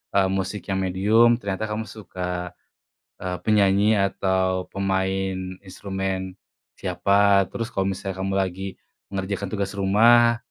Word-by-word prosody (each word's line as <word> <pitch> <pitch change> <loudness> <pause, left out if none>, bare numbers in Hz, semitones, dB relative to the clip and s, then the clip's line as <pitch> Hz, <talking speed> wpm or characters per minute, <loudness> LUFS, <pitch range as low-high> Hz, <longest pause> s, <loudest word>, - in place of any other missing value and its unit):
eee, 95 -1 +3
musik 95 +1 -2
yang 95 - 0
medium, 105 +6 +4
ternyata 100 -2 -3
kamu 105 +1 -3
suka, 90 -4 -6 0.6
eee, 90 -1 -4
penyanyi 105 +1 +3
atau 95 -2 0
pemain 95 -1 -2
instrumen 95 -1 -4 0.4
siapa. 100 -1 +3
Terus 115 -1 -5
kalo 95 0 0
misalnya 95 0 -4
kamu 95 +1 -2
lagi 95 0 -1 0.4
mengerjakan 100 0 -3
tugas 100 -1 -3
rumah, 115 +4 +5
95 Hz, 120 wpm, -24 LUFS, 95-100 Hz, 0.6 s, rumah